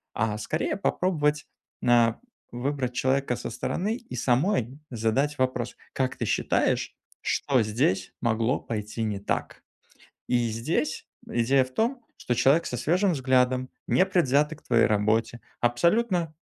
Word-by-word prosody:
а 105 Hz, -1 st, 0 dB
скорее 155 Hz, -, -2 dB
попробовать, 150 Hz, -7 st, 0 dB, 0.4 s
на 120 Hz, -2 st, +3 dB, 0.3 s
выбрать 125 Hz, 0 st, -2 dB
человека 130 Hz, 0 st, +1 dB
со -, -, -5 dB
стороны 190 Hz, -, -2 dB
и 235 Hz, -, -10 dB
самой 130 Hz, -, +1 dB
задать 130 Hz, +5 st, 0 dB
вопрос: 130 Hz, -2 st, -1 dB, 0.2 s
"Как 130 Hz, -1 st, -1 dB
ты -, -, -2 dB
считаешь, -, -, 0 dB, 0.3 s
что 130 Hz, -4 st, +1 dB
здесь 105 Hz, -4 st, 0 dB
могло 115 Hz, +2 st, +1 dB
пойти 110 Hz, 0 st, -4 dB
не 105 Hz, -2 st, -2 dB
так?" 100 Hz, -, -3 dB, 0.7 s
И 120 Hz, -2 st, +2 dB
здесь 150 Hz, +7 st, -2 dB, 0.2 s
идея 130 Hz, +3 st, +3 dB
в 130 Hz, -, -12 dB
том, 240 Hz, +3 st, 0 dB, 0.2 s
что 120 Hz, -, -2 dB
человек 140 Hz, +7 st, +4 dB
со 125 Hz, -, -3 dB
свежим 175 Hz, -, +2 dB
взглядом, 130 Hz, -2 st, +2 dB, 0.2 s
непредвзято 155 Hz, -5 st, +2 dB
к -, -, -23 dB
твоей 115 Hz, -2 st, +3 dB
работе, 110 Hz, +3 st, +1 dB, 0.2 s
абсолютно 170 Hz, -, +2 dB
130 Hz, 130 wpm, -26 LUFS, 115-150 Hz, 0.7 s, человек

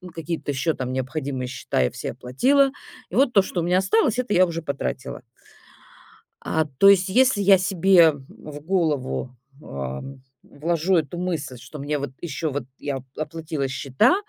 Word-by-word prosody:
какие-то 165 Hz, -2 st, -3 dB
ещё 140 Hz, +4 st, 0 dB
там 130 Hz, -3 st, -4 dB
необходимые 130 Hz, 0 st, -3 dB
счета 125 Hz, -, -2 dB
я 60 Hz, -, +1 dB
все -, -, -5 dB
оплатила. 270 Hz, -, +2 dB, 0.4 s
И -, -, -7 dB
вот 265 Hz, -2 st, +3 dB
то, 200 Hz, -, +6 dB
что 185 Hz, -2 st, -3 dB
у -, -, -2 dB
меня 180 Hz, +2 st, +2 dB
осталось, 220 Hz, +5 st, +2 dB
это 250 Hz, -4 st, -1 dB
я 185 Hz, +1 st, +6 dB
уже 165 Hz, -1 st, -4 dB
потратила. 140 Hz, -4 st, -4 dB, 1.2 s
А, 160 Hz, -1 st, 0 dB
то 150 Hz, +7 st, +4 dB
есть 195 Hz, -1 st, +4 dB
если 250 Hz, 0 st, +3 dB
я 195 Hz, 0 st, +6 dB
себе 185 Hz, -2 st, +5 dB
в 145 Hz, +1 st, -11 dB
голову, 150 Hz, -7 st, -1 dB, 0.3 s
ам, 70 Hz, -, -6 dB, 0.2 s
вложу 170 Hz, +4 st, -1 dB
эту 160 Hz, +2 st, -2 dB
мысль, 160 Hz, -8 st, -3 dB
что 140 Hz, +5 st, -11 dB
мне 145 Hz, +2 st, -2 dB
вот 140 Hz, -2 st, -4 dB
ещё 160 Hz, -1 st, -3 dB
вот 140 Hz, -1 st, -3 dB, 0.2 s
я 140 Hz, -2 st, -3 dB
оп 130 Hz, -, -11 dB
оплатила 155 Hz, -2 st, -3 dB
счета, 135 Hz, -, +2 dB
155 Hz, 170 wpm, -23 LUFS, 135-185 Hz, 1.2 s, то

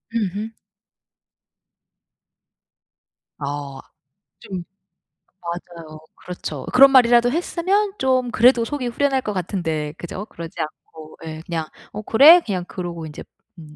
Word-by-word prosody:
으흠. 210 Hz, +1 st, -2 dB, 2.9 s
아 140 Hz, -1 st, -5 dB, 0.6 s
좀 185 Hz, -3 st, -6 dB, 0.8 s
맞아요. 170 Hz, -2 st, -8 dB, 0.2 s
그렇죠. 155 Hz, -6 st, -7 dB
그런 270 Hz, +2 st, +8 dB
말이라도 240 Hz, -2 st, +5 dB
했으면 375 Hz, +5 st, 0 dB
좀 255 Hz, -2 st, +1 dB
그래도 240 Hz, 0 st, +4 dB
속이 275 Hz, -1 st, -3 dB
후련할 270 Hz, +2 st, 0 dB
것 210 Hz, -, -4 dB
같은데 165 Hz, -5 st, -3 dB
그죠? 185 Hz, +4 st, -7 dB
그러지 165 Hz, -6 st, -10 dB
않고 155 Hz, 0 st, -9 dB
예. 155 Hz, 0 st, -7 dB
그냥 165 Hz, -2 st, -3 dB, 0.3 s
"어 210 Hz, -, -6 dB
그래?" 290 Hz, +11 st, +7 dB
그냥 185 Hz, -5 st, -3 dB
그러고 175 Hz, -3 st, -6 dB
인제 150 Hz, -1 st, -9 dB, 0.4 s
음. 150 Hz, -2 st, -13 dB
190 Hz, 230 characters per minute, -21 LUFS, 160-250 Hz, 2.9 s, 그런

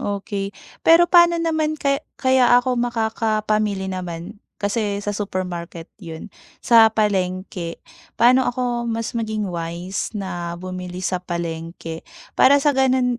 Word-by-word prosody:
okey. 200 Hz, -1 st, -4 dB, 0.3 s
Pero 330 Hz, +1 st, +6 dB
paano 345 Hz, -1 st, +6 dB
naman 315 Hz, -2 st, 0 dB
ka 280 Hz, -1 st, 0 dB, 0.2 s
kaya 260 Hz, -2 st, +4 dB
ako 250 Hz, 0 st, +1 dB
makakapamili 215 Hz, -4 st, 0 dB
naman? 180 Hz, +2 st, -6 dB, 0.2 s
Kasi 205 Hz, -1 st, -2 dB
sa 205 Hz, 0 st, -2 dB
supermarket 180 Hz, -4 st, -5 dB
'yun, 165 Hz, +1 st, -9 dB, 0.3 s
sa 230 Hz, -2 st, +7 dB
palengke, 185 Hz, -5 st, -2 dB, 0.4 s
paano 255 Hz, +3 st, +5 dB
ako 245 Hz, -1 st, -2 dB
mas 230 Hz, 0 st, -3 dB
maging 220 Hz, -4 st, -2 dB
wise 175 Hz, +4 st, -4 dB
na 175 Hz, -4 st, -4 dB
bumili 185 Hz, 0 st, -7 dB
sa 180 Hz, 0 st, 0 dB
palengke 165 Hz, -1 st, -5 dB, 0.4 s
para 280 Hz, +2 st, +7 dB
sa 295 Hz, -, +4 dB
gano'n, 255 Hz, -2 st, +2 dB
205 Hz, 125 wpm, -21 LUFS, 180-245 Hz, 0.4 s, sa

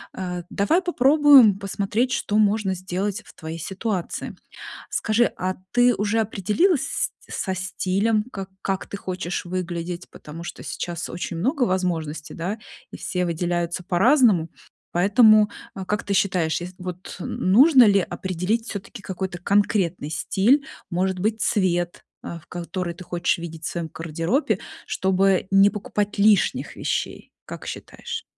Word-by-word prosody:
Э, 180 Hz, -2 st, -4 dB
давай 315 Hz, -, +2 dB
попробуем 280 Hz, -, +6 dB
посмотреть, 200 Hz, +5 st, -1 dB
что 210 Hz, -5 st, 0 dB
можно 210 Hz, -2 st, +2 dB
сделать 190 Hz, +2 st, -3 dB
в -, -, -15 dB
твоей 160 Hz, +1 st, -7 dB
ситуации. 190 Hz, +1 st, -3 dB, 0.6 s
Скажи, 230 Hz, +2 st, +2 dB
а 185 Hz, +1 st, -2 dB, 0.2 s
ты 245 Hz, 0 st, +5 dB
уже 210 Hz, +2 st, 0 dB
определилась 220 Hz, -, +1 dB
с -, -, 0 dB, 0.2 s
со 190 Hz, -, -2 dB
стилем, 195 Hz, +4 st, 0 dB
как 195 Hz, -1 st, -6 dB
как 195 Hz, -1 st, -2 dB
ты 200 Hz, -, -5 dB
хочешь 180 Hz, -2 st, -4 dB
выглядеть? 175 Hz, -1 st, -4 dB
Потому 160 Hz, +3 st, -10 dB
что -, -, -7 dB
сейчас 175 Hz, -1 st, -4 dB
очень 175 Hz, -1 st, -4 dB
много 255 Hz, -, 0 dB
возможностей, 165 Hz, -6 st, -2 dB
да, 185 Hz, +6 st, -3 dB, 0.3 s
и -, -, -6 dB
все 180 Hz, -1 st, -2 dB
выделяются 175 Hz, +1 st, -2 dB
по-разному. 200 Hz, -, +4 dB, 0.4 s
Поэтому, 210 Hz, +3 st, +5 dB, 0.3 s
э, 190 Hz, -, -5 dB
как 210 Hz, +2 st, -1 dB
ты 200 Hz, -, -1 dB
считаешь, 180 Hz, -5 st, +1 dB
ес 180 Hz, +1 st, -7 dB
вот, 180 Hz, 0 st, -7 dB
н 185 Hz, +1 st, -1 dB
нужно 265 Hz, +2 st, +8 dB
ли 200 Hz, -2 st, +5 dB
определить 190 Hz, +5 st, -2 dB
всё-таки 205 Hz, +2 st, -7 dB
какой-то 190 Hz, -1 st, -4 dB
конкретный 185 Hz, -4 st, +1 dB
стиль, 210 Hz, -, +2 dB, 0.3 s
может 185 Hz, +1 st, 0 dB
быть, 215 Hz, +3 st, 0 dB
цвет, 175 Hz, -3 st, 0 dB, 0.2 s
э, 170 Hz, -, -6 dB
в -, -, -24 dB
который 175 Hz, 0 st, -4 dB
ты 180 Hz, -, -11 dB
хочешь 175 Hz, 0 st, 0 dB
видеть 165 Hz, -1 st, -8 dB
в -, -, 0 dB
своём 165 Hz, -3 st, -4 dB
гардеробе, 165 Hz, -, -1 dB, 0.3 s
чтобы 190 Hz, 0 st, +2 dB
не 195 Hz, +1 st, +6 dB
покупать 205 Hz, 0 st, -3 dB
лишних 205 Hz, 0 st, +3 dB
вещей, -, -, -3 dB
как -, -, -9 dB
считаешь? 455 Hz, -, -6 dB
190 Hz, 145 wpm, -23 LUFS, 175-210 Hz, 0.6 s, нужно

